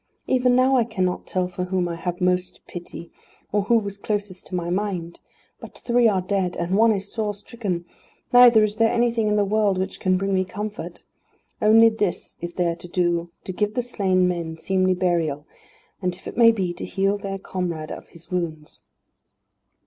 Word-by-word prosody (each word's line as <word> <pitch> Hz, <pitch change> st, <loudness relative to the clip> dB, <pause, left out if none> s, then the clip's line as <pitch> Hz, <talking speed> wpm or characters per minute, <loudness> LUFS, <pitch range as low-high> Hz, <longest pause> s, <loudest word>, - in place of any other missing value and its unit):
Even 250 Hz, -1 st, +3 dB
now 260 Hz, +1 st, +4 dB
I 240 Hz, -, +4 dB
cannot 185 Hz, -5 st, -2 dB
tell 185 Hz, -1 st, 0 dB
for 180 Hz, 0 st, -4 dB
whom 180 Hz, -1 st, 0 dB
I 170 Hz, -, -3 dB
have 175 Hz, +1 st, -4 dB
most 180 Hz, 0 st, 0 dB
pity, 175 Hz, -1 st, -9 dB, 0.4 s
or 205 Hz, -, +2 dB
who 230 Hz, +4 st, +3 dB
was 200 Hz, -2 st, -4 dB
closest 205 Hz, -3 st, -4 dB
to -, -, -5 dB
my 175 Hz, -1 st, -2 dB
mind. 180 Hz, -3 st, -3 dB, 0.4 s
But -, -, -11 dB
three 240 Hz, -1 st, +3 dB
are 190 Hz, -4 st, +1 dB
dead, 185 Hz, -2 st, -1 dB
and 175 Hz, +2 st, -1 dB
one 225 Hz, +2 st, +5 dB
is 200 Hz, -1 st, -3 dB
sore 210 Hz, -2 st, -2 dB
stricken; 200 Hz, -5 st, -5 dB, 0.5 s
neither 245 Hz, -3 st, +8 dB
is 210 Hz, 0 st, -1 dB
there 225 Hz, 0 st, +3 dB
anything 235 Hz, -2 st, +1 dB
in 210 Hz, -, +2 dB
the 205 Hz, -1 st, +2 dB
world 205 Hz, -1 st, +2 dB
which 190 Hz, +1 st, -3 dB
can 185 Hz, -1 st, +2 dB
bring 195 Hz, +1 st, -1 dB
me 185 Hz, 0 st, +2 dB
comfort. 210 Hz, +3 st, -6 dB, 0.6 s
Only 225 Hz, +1 st, +7 dB
this 210 Hz, -5 st, -2 dB
is 175 Hz, 0 st, -5 dB
there 170 Hz, -2 st, 0 dB
to 175 Hz, -, -10 dB
do 175 Hz, -1 st, 0 dB
to 185 Hz, -, -5 dB
give 210 Hz, +3 st, -1 dB
the 245 Hz, -, 0 dB
slain 190 Hz, -6 st, +1 dB
men 170 Hz, -2 st, -3 dB
seemly 185 Hz, +1 st, +1 dB
burial, 165 Hz, -5 st, 0 dB, 0.6 s
and, 180 Hz, -1 st, -1 dB
if 185 Hz, -, -17 dB
it -, -, -7 dB
may 230 Hz, -1 st, +7 dB
be, 190 Hz, -6 st, -2 dB
to 175 Hz, -, -8 dB
heal 195 Hz, +1 st, 0 dB
their 195 Hz, -1 st, -4 dB
comrade 175 Hz, -5 st, -4 dB
of -, -, -8 dB
his 170 Hz, +1 st, -18 dB
wounds." 160 Hz, -4 st, -4 dB
190 Hz, 195 wpm, -23 LUFS, 180-215 Hz, 0.6 s, neither